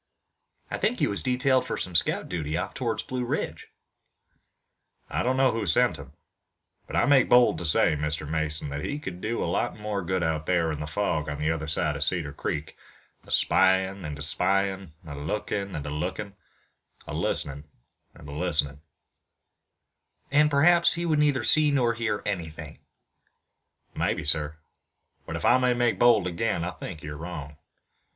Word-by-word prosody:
"I - - -3
think - - +1
he - - +2
was 100 - +2
detailed 130 0 +2
for - - -3
some 90 - -4
scout 85 - +1
duty 80 -2 -3
off 90 +2 -3
toward 120 -4 -2
the - - -16
Blue 125 -1 -2
Ridge." 120 - -3 1.4
"I - - 0
don't 130 +1 0
know 130 -1 +4
who 110 -3 -3
sent 80 - +3
him, - - -12 0.7
but - - -6
I - - +3
make 140 -3 +4
bold 120 -9 +5
to 85 - -4
say, 80 -1 +3
Mr. 75 +1 -2
Mason, 80 -1 -1
that 70 0 -5
he 145 - -3
could 95 -12 -7
do 115 +2 -2
a - - -1
lot - - -1
more 105 -2 -3
good 95 +1 -1
out 80 -1 -1
there 85 -3 +2
in 75 - -4
the 75 - -4
fog 75 -2 -1
on 75 - -4
the 75 +2 0
other 80 -1 -3
side 75 -1 -1
of 70 - -1
Cedar 75 -3 -1
Creek, 75 +1 -4 0.5
a - - -11
spyin' 95 0 +2
and 75 -2 -5
a 75 - -6
spyin', 95 +2 0
a 75 - -8
lookin' 100 +6 -3
and 75 - -5
a 75 - -4
lookin', 95 +7 -4 0.7
a - - -7
listenin' 70 +1 0 0.5
and - - -13
a - - -8
listenin'." 75 -2 -1 1.5
"And 150 +1 +5
perhaps 170 +4 +4
he 170 +1 -2
would 155 -3 +2
neither 145 -3 +2
see 155 -1 +5
nor 125 -5 +2
hear 115 -3 -2
anything" 80 -6 -5 1.1
"Maybe, - - -1
sir, 75 +1 +1 0.7
but - - -4
if - - -4
I 130 - +5
may 125 -1 +2
make 120 -1 +1
bold 120 -6 +5
again, 90 +1 -1
I 90 - -2
think 80 -4 -8
you're 75 0 -6
wrong. 75 -3 -7
90 Hz, 180 wpm, -26 LUFS, 75-120 Hz, 1.5 s, bold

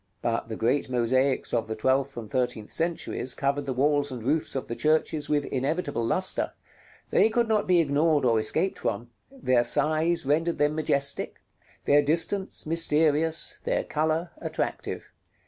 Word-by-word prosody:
But 115 -1 -1
the 110 - -5
great 130 +5 0
mosaics 130 +2 +1
of 115 - 0
the 110 - -4
twelfth 130 +4 0
and 115 -2 -6
thirteenth 120 -2 -2
centuries 165 -6 -2
covered 140 +1 -1
the - - -1
walls 145 +2 +1
and 125 -3 -6
roofs 150 +5 0
of 135 - -3
the - - -4
churches 155 0 0
with 145 -1 +1
inevitable 145 0 -2
lustre; 185 +11 0 0.6
they - - +4
could 235 +1 +1
not 215 -2 +1
be 180 -1 +4
ignored 150 -1 +2
or 115 -2 +3
escaped 160 - -1
from; 120 +4 -3 0.2
their 130 - +1
size 155 +5 +1
rendered 165 +4 +1
them 150 0 +2
majestic, 140 -3 0 0.4
their 145 +1 +4
distance 165 +6 0
mysterious, 160 0 +2
their - - 0
color 160 +3 -1
attractive. - - -4
145 Hz, 155 wpm, -26 LUFS, 130-160 Hz, 0.6 s, they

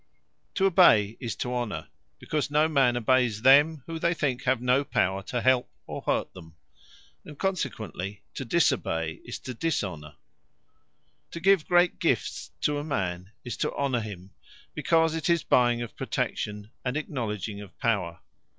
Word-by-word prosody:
To 195 - +2
obey, 140 - +5
is 115 -5 -4
to 125 +2 -3
Honour; 120 -3 -3 0.3
because 150 -1 -2
no 150 +2 +3
man 135 -6 +3
obeyes 120 -2 +2
them, 145 +2 +6
whom 165 -1 -5
they 170 +2 +1
think 135 -3 -1
have 130 -1 +2
no 125 +3 +2
power 95 -7 0
to 120 +4 -3
help, 130 0 +3 0.2
or - - -6
hurt - - -1
them. 80 -3 -13 0.7
And 150 - -11
consequently 110 - -3
to - - -5
disobey, 110 - 0
is - - -5
to 130 - -6
Dishonour. 95 - -3 1.1
To 170 - -7
give 190 -2 +3
great 175 0 +3
gifts - - -1
to 145 0 +1
a - - -4
man, 95 - -3
is 120 -3 -5
to - - -1
Honour 135 -4 0
him; 95 -3 -8 0.4
because 165 -1 +2
'tis 170 -1 +2
buying 120 -1 +3
of 120 - -9
Protection, 105 +1 -3
and 125 +2 -1
acknowledging 105 - -4
of 100 - -13
Power. 95 -8 -1
125 Hz, 155 wpm, -27 LUFS, 105-150 Hz, 1.1 s, them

